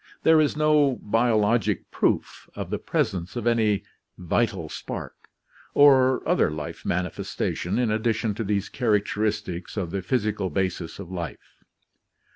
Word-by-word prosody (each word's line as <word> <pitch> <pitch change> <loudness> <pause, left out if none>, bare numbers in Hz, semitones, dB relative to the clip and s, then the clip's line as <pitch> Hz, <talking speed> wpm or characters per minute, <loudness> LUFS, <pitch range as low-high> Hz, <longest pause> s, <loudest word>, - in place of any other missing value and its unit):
There 160 -1 +6
is 150 0 0
no 150 -3 +3
biologic 115 -1 +1
proof - - -1
of - - -5
the - - -1
presence 90 +1 -2
of 120 -2 -3
any 110 -4 +2 0.3
"vital 95 -1 0
spark" - - -6 0.6
or 130 -3 +5
other - - +3
life 75 -1 -6
manifestation 90 0 -2
in 120 -3 +1
addition 110 0 0
to 115 - -3
these 100 -1 -1
char 110 -3 +2
acteristics 105 -3 -3
of 90 -5 -2
the 100 0 -2
physical 105 -1 -1
basis 90 -1 -2
of 95 -2 -9
life. 85 -7 -6
105 Hz, 135 wpm, -25 LUFS, 95-120 Hz, 0.6 s, There